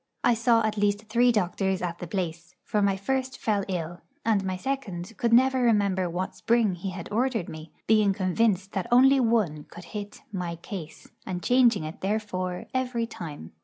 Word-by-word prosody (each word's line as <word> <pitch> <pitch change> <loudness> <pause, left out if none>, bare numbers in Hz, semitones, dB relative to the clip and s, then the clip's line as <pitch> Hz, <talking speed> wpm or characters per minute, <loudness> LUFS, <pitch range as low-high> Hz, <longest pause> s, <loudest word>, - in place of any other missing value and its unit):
I 245 - +5
saw 230 0 +3
at 215 -1 -1
least 205 +1 0
three 245 +2 +4
doctors 190 -2 0
at 175 -1 -4
the 175 - -6
place; 170 -1 -4
for 210 - 0
my 200 -1 +2
first 260 +5 -2
fell 205 -3 0
ill, 175 -2 -4 0.2
and 215 -3 +2
my 185 -1 -2
second 215 -5 -4
could 235 +3 0
never 260 +2 +5
remember 200 -6 +2
what 180 +2 -3
spring 230 -4 +2
he 180 +2 -5
had 180 -2 -6
ordered 230 -3 0
me, 155 0 -9
being 215 -2 +4
convinced 195 +1 +1
that 190 -3 -2
only 265 +3 +6
one 215 - +1
could 175 - -12
hit 205 -1 -6
'my 180 -4 -3
case,' 170 -2 -8 0.2
and 180 -2 -5
changing 240 -7 +4
it, 155 +1 -7
therefore, 190 -3 -2
every 250 -3 0
time. 155 - -8
200 Hz, 180 wpm, -27 LUFS, 180-230 Hz, 0.2 s, only